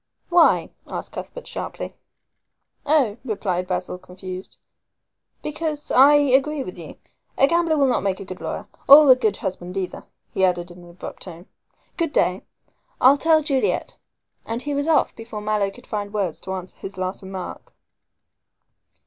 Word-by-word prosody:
"Why?" 345 -2 +4 0.2
asked - - -5
Cuthbert - - -8
sharply. - - -6 0.9
"Oh," 270 -8 +3
replied 190 -6 -2
Basil, 180 0 -3
confused, 185 0 -9 0.9
"because 300 -1 -3
I 275 +3 +7
agree 285 +1 +3
with 180 - -8
you. 165 -3 -10 0.4
A - - +6
gambler 335 +1 +2
will 280 - +4
not 255 -2 +2
make 190 -1 -1
a - - -7
good 185 -1 -9
lawyer - - -5 0.2
or 285 0 +10
a - - +9
good 220 -6 0
husband 180 0 -4
either," 185 -2 -4 0.3
he 190 - 0
added 175 -1 +1
in 175 - -13
an 175 - -14
abrupt 170 +1 -9
tone. 175 -1 -9 0.5
"Good 330 -4 -1
day. 185 -8 +2 0.6
I'll 260 +2 +7
tell 315 +1 +3
Juliet," 275 -3 0 0.5
and 230 +2 -4
he 290 - -2
was 285 +2 -1
off 320 -2 +3
before 225 -1 -7
Mallow 210 -1 0
could 245 +6 -15
find 205 -2 -4
words 195 -6 -2
to 190 - -5
answer 185 0 -8
his 195 0 -8
last 185 0 -3
remark. 190 -1 -7
215 Hz, 160 wpm, -23 LUFS, 185-285 Hz, 0.9 s, or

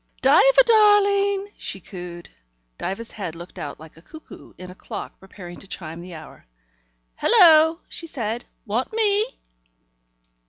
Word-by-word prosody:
"Diva - - +6
darling!" 405 -2 +3
she 195 - -5
cooed. 175 -2 -9 0.5
Diva's 210 +5 -5
head 180 -6 -6
looked 175 +2 -11
out 145 - -7
like 160 0 -15
a - - -16
cuckoo 315 - -14
in 180 0 -10
a - - -11
clock - - -9
preparing 180 -2 -12
to 195 - -13
chime 165 -3 -7
the 175 -1 -10
hour. 155 - -13 0.7
"Hullo!" 325 -7 +6
she 335 - -7
said. 235 -5 -4 0.2
"Want 230 +4 -2
me?" 435 +1 0
230 Hz, 135 wpm, -22 LUFS, -, 0.7 s, Diva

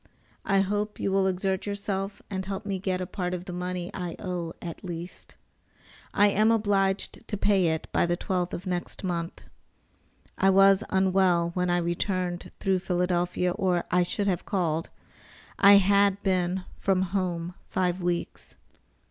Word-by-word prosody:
I 195 -1 +3
hope 205 +2 -2
you 195 - -1
will 195 0 +3
exert 190 +1 -1
yourself 200 -1 -3
and 190 -2 -3
help 195 0 -5
me 195 -2 -2
get 185 -1 -1
a - - -2
part 180 0 -3
of 180 0 -7
the 180 - -6
money 180 0 -4
I 175 -2 -4
owe, 175 -4 -4
at 170 +2 -8
least. 175 -1 -7 0.8
I 205 0 +5
am 215 +2 +3
obliged 205 -1 0
to 210 - -3
pay 195 -3 +3
it 160 -1 -1
by - - +2
the 175 0 0
12th 180 -1 -2
of 180 - -5
next 180 +1 -4
month. 170 -2 -3 1.0
I 195 - +4
was 195 +1 +6
unwell 185 -3 +2
when 180 0 0
I 175 - +2
returned 175 +1 -2
through 190 -2 +1
Philadelphia, 180 -1 0
or 180 -1 0
I 180 - +4
should 190 +3 0
have 185 -3 0
called. 165 -4 -1 0.7
I 200 0 +8
had 200 0 +4
been 185 -1 0 0.2
from 190 -1 +2
home 180 -2 -2 0.2
five 180 0 0
weeks. 175 -1 -3
185 Hz, 160 wpm, -27 LUFS, 175-195 Hz, 1.0 s, I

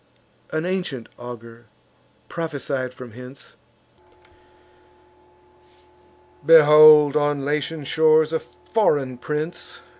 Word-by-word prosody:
An 155 +1 -4
ancient 180 -10 -4
augur 120 -1 -12 0.6
prophesied 140 -5 -5
from 125 -1 -12
hence: 125 +4 -13 2.9
"Behold 150 -2 +6
on 145 -2 -1
Latian 150 +1 -3
shores 155 +1 +2
a 160 - 0
foreign 145 - -2
prince! 150 +5 -6
150 Hz, 80 wpm, -21 LUFS, 130-155 Hz, 2.9 s, Behold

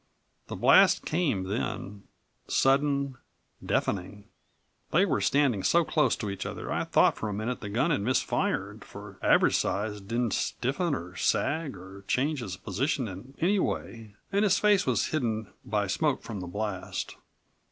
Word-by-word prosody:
The - - -5
blast - - +5
came 155 - 0
then, 100 0 -4 0.4
sudden, 140 -1 +2 0.4
deafening. 100 +1 -2 0.7
They - - +4
were - - 0
standing 135 -8 +2
so 170 - +3
close 150 -7 +2
to 105 - -4
each 100 - -5
other - - -6
I - - -1
thought - - +3
for 110 - -3
a - - -3
minute 115 +4 -3
the 105 - -5
gun 130 +11 +1
had 145 - +1
misfired, 125 +5 -1
for - - -11
Average - - +4
Size 105 0 -2
didn't 115 +3 -1
stiffen 145 +5 -1
or 90 -5 -7
sag 145 - 0
or 95 +2 -12
change 145 +3 0
his 95 -7 -5
position 125 - -1
in 105 +8 -10
any 195 +5 +2
way 110 - -4 0.2
and 200 - +2
his 200 -3 +4
face 205 -5 +3
was 120 -4 +1
hidden 110 -8 -2
by 105 -1 0
smoke 145 +9 0
from 110 -4 -6
the 90 - -6
blast. 100 0 -4
115 Hz, 160 wpm, -28 LUFS, 100-145 Hz, 0.7 s, blast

